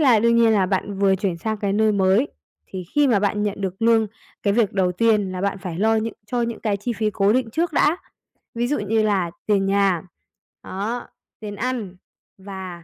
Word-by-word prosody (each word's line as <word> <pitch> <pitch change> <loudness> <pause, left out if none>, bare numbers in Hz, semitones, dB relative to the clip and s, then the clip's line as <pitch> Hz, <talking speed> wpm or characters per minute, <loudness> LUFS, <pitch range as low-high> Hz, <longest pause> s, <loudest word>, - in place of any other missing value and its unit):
là 255 -7 +5
đương 235 +1 +3
nhiên 230 -1 +5
là 195 -3 +3
bạn 195 +1 -2
vừa 195 -1 +4
chuyển 185 -3 -2
sang 220 +4 -2
cái 200 -1 -1
nơi 215 +1 +3
mới, 195 +7 +3 0.4
thì 185 -2 -7
khi 295 -1 +4
mà 220 -5 +4
bạn 210 +1 0
nhận 205 -1 -2
được 190 +2 -4
lương, 225 -1 +4 0.4
cái 200 - +2
việc 220 -3 +2
đầu 185 -2 +1
tiên 210 -1 +2
là 185 - -4
bạn 200 0 -1
phải 180 -2 -6
lo 220 +2 +3
những 220 0 -2
cho 240 +2 -1
những 230 -1 -3
cái 210 -3 0
chi 220 +4 -3
phí 215 -1 -1
cố 200 0 +2
định 245 -1 0
trước 325 +6 -1
đã, 305 +3 +3 0.6
ví 240 +1 0
dụ 290 - 0
như 215 +2 +1
là 195 -5 +1 0.2
tiền 200 -2 +2
nhà, 195 -4 +2 0.6
đó, 215 +6 -4 0.3
tiền 205 -2 -6
ăn 230 -6 -3 0.4
và, 190 -3 -8
205 Hz, 215 wpm, -22 LUFS, 195-230 Hz, 0.6 s, là